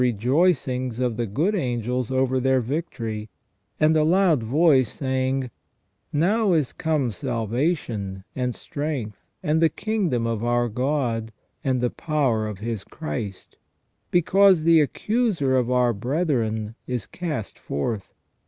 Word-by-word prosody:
293 125 -4 +2
rejoicings 130 -6 +2
of 125 -3 0
the 120 0 -2
good 155 - 0
angels 125 - -1
over 130 0 +1
their 130 0 +3
victory, 115 -5 -4 0.5
and 155 +1 +4
a 155 - +4
loud 170 -3 +3
voice 135 0 +3
saying: 130 -1 -1 0.3
" - - -48
Now 195 +6 +2
is 150 -6 +1
come 150 -6 0
salvation, 115 - -2
and 125 -2 -1
strength, 140 -8 -4 0.2
and 155 +2 +2
the 165 - +5
kingdom 195 - -1
of 115 -1 -2
our 120 0 +1
God, 120 -2 -1 0.3
and 130 -3 +1
the 125 - +1
power 135 -9 0
of 105 -2 -5
His 110 0 -4
Christ: 110 - -6 0.5
because 180 0 +4
the 165 -1 +6
accuser 185 - +1
of 125 -2 +1
our 125 -1 +3
brethren 115 - -1
is 125 -5 -2
cast 150 - -5
forth. 100 +8 -3
130 Hz, 135 wpm, -24 LUFS, 115-155 Hz, 0.5 s, the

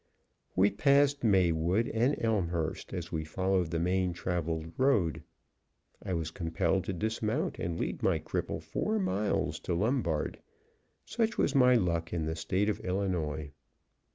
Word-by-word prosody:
We 100 +2 +4
passed 140 +7 +3
Maywood 95 +1 +3
and 125 +2 +2
Elmhurst 90 -8 -1
as 85 -3 -5
we 80 -2 -2
followed 95 +2 0
the 85 - -1
main 90 +1 +1
traveled 85 -2 -2
road. 115 - +2 0.8
I 95 - -3
was 80 -1 -3
compelled 85 +1 0
to 95 - -2
dismount 110 - -1
and 85 -1 -3
lead - - -3
my - - +2
cripple - - -3
four 220 +1 -1
miles 100 - 0
to 85 - -2
Lombard. 100 - 0 0.7
Such 225 -1 -1
was 140 - +2
my 125 -3 +6
luck 85 -6 0
in 80 -2 -1
the 80 +1 -2
State 95 +5 0
of 105 - 0
Illinois. 85 -6 -2
95 Hz, 145 wpm, -30 LUFS, 85-110 Hz, 0.8 s, my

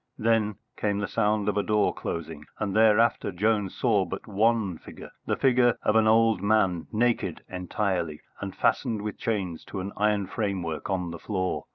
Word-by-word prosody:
Then 110 -2 +1 0.2
came 100 -1 0
the 105 -1 -2
sound 105 -2 +1
of 105 -1 0
a - - +3
door 105 0 +1
closing, 80 -2 -5
and 100 -2 -2
thereafter 110 -1 +4
Jones 105 +1 0
saw 110 -6 +2
but 95 +1 -6
one 110 -3 +1
figure, - - -11 0.2
the - - +1
figure 125 -2 +3
of 105 - +2
an 110 -1 +5
old 115 -3 +4
man, 100 -5 +2
naked 120 +2 0
entirely, 90 -3 -2 0.2
and - - -6
fastened 110 -3 0
with 105 -1 -5
chains 95 -7 -2
to 100 - -6
an 95 +2 -4
iron 105 -1 +1
framework 95 -6 -3
on 90 -3 -1
the 85 - -7
floor. 95 -3 -2
105 Hz, 175 wpm, -27 LUFS, 95-110 Hz, 0.2 s, an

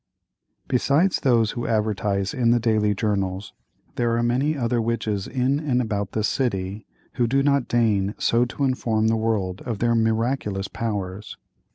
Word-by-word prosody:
Besides 145 +9 +2
those 115 -5 +2
who 120 - -4
advertise 105 -3 0
in 120 -2 +1
the 120 0 +4
daily 110 -2 +1
journals, 100 -2 -2 0.4
there 115 -1 +1
are 120 - +1
many 135 +6 +1
other 120 -2 0
witches 110 -3 -2
in 130 +2 0
and 140 -5 0
about 105 -5 -2
the 110 - -1
city 100 -3 -2 0.3
who 120 -2 +2
do 135 +3 +2
not 140 -3 +2
deign 105 -4 +1
so 115 +1 +2
to 130 +3 -4
inform 115 -4 +1
the 115 - +2
world 105 -5 -1
of 120 -4 -3
their 115 +3 +1
miraculous 110 -3 0
powers. 105 -3 -4
115 Hz, 160 wpm, -23 LUFS, 105-125 Hz, 0.4 s, the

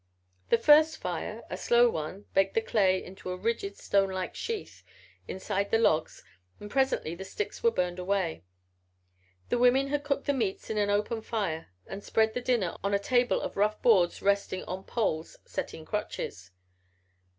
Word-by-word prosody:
The - - +5
first 305 +6 +6
fire 185 +5 -4
a - - -1
slow 240 0 +4
one 185 0 -4
baked 195 0 +2
the 225 - +3
clay 190 -5 +2
into 185 0 -9
a 180 - -3
rigid 200 0 -2
stonelike 190 -2 0
sheath 450 -3 -5 0.5
inside 195 +1 -2
the 225 - +3
logs 160 -8 +1 0.4
and 205 0 -9
presently 265 -11 +1
the 180 +3 -7
sticks 415 - -5
were 465 - +5
burned 180 - -1
away. 180 - -1 1.1
The 245 - +1
women 260 +3 +4
had 290 0 -1
cooked 280 -1 -1
the 285 - +2
meats 220 -8 -2
by 215 -1 -1
an 205 -1 +1
open 210 +2 0
fire 200 -8 -3 0.2
and 200 +1 -8
spread 220 0 +2
the 250 - -2
dinner 235 -8 0
on 200 0 +1
a - - +5
table 245 +3 +2
of - - -5
rough 210 +1 +2
boards 190 -8 +4
resting 200 -2 +1
on 185 +1 -6
poles 165 -9 -2
set - - -4
in 160 - -10
crotches. 105 - -4
205 Hz, 175 wpm, -29 LUFS, 185-240 Hz, 1.1 s, first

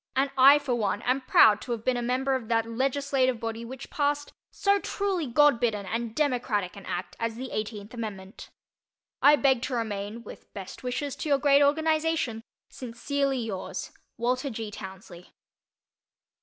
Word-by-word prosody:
And 270 +1 +1
I, 275 +2 +8
for 285 -4 -2
one, 210 -2 -1
am 255 +2 +1
proud 215 -4 +5
to 245 - -3
have 225 -1 -6
been 255 - +2
a 245 - -1
member 255 +3 0
of 255 -4 -2
that 225 0 +1
legislative 260 +1 0
body 225 0 -4
which 260 +2 -9
passed 290 0 -1 0.2
so 400 0 +2
truly 390 -6 -2
God 290 0 +4
bidden 215 -4 0
and 230 +2 -3
democratic 245 -10 0
an 200 - -11
act 180 +2 -4
as 230 -1 -2
the 255 +2 -6
Eighteenth 215 0 -5
Amendment. 205 -4 -7 0.7
I 295 - +7
beg 270 -4 +2
to 260 0 -2
remain, 220 0 -4
with - - -12
best 195 -2 -8
wishes 260 +2 -3
to 310 - -4
your 280 - +4
great 280 0 +4
organization, 310 -4 +1 0.3
Sincerely 270 +3 -2
yours, 220 -6 -5 0.3
WALTER 255 +4 0
G. 220 -3 -5
TOWNSLEY. 190 -3 -11
245 Hz, 165 wpm, -27 LUFS, 220-280 Hz, 0.7 s, I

